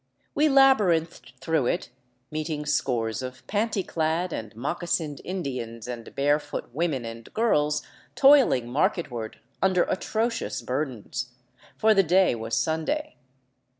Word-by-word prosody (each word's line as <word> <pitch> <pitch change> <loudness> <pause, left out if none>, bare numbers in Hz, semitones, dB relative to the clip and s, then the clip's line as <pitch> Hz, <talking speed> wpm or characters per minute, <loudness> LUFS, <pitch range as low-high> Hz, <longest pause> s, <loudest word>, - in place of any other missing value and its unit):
We 305 +1 +3
labyrinthed 205 - +3
through 150 -3 +1
it, - - -1 0.4
meeting 155 -1 -3
scores 125 -6 0
of 130 0 -8
panty 205 -2 -1
clad 165 +2 -1
and 110 -2 -5
moccasined 150 +3 -2
Indians 125 - -5
and 120 -2 -7
barefoot 145 0 0
women 145 -5 -1
and 115 0 -9
girls 150 -10 +2 0.3
toiling 270 - +5
marketward 120 -3 -1 0.3
under 185 -2 +3
atrocious 225 +5 -2
bur 135 +5 0
dens; 125 0 -6 0.4
for 220 0 +5
the 195 - +5
day 185 -1 +4
was 115 0 -3
Sunday. 235 - -1
155 Hz, 120 wpm, -26 LUFS, 125-185 Hz, 0.4 s, toiling